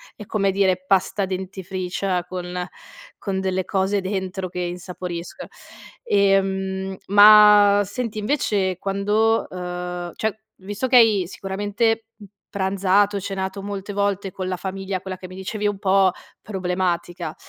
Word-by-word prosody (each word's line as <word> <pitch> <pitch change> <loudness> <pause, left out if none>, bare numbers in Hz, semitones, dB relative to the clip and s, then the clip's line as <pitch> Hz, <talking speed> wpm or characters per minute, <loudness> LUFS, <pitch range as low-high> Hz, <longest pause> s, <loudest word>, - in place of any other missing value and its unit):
è, 210 - -10
come 200 -1 0
dire, 185 -1 +1
pasta 195 +1 +2
dentifricia 185 0 -3
con 180 0 -5 0.5
con 190 -2 -3
delle 190 -1 -1
cose 195 +1 0
dentro 190 -1 -3
che 180 0 -7
insaporiscono. 175 0 -6 0.5
Ehm, 195 - +1
ma 205 0 +8
senti 215 +2 -4
invece 205 -6 0
quando, 205 +4 +1
uhm, 180 -1 -5
cioè 220 -1 -1 0.3
visto 205 +6 -3
che 255 - +2
hai 220 -5 +6
sicuramente 205 +4 -1
p 215 - -15 0.3
pranzato, 200 +1 +1
cenato 195 0 -4
molte 200 0 -5
volte 200 -1 -1
con 185 0 -5
la 185 - -1
famiglia, 190 0 -4
quella 190 -1 -6
che 185 - -9
mi 185 - -11
dicevi 210 +2 -3
un 205 -1 -2
po' 195 -1 +4 0.3
problematica, 180 -3 -2
195 Hz, 130 wpm, -22 LUFS, 185-205 Hz, 0.5 s, ma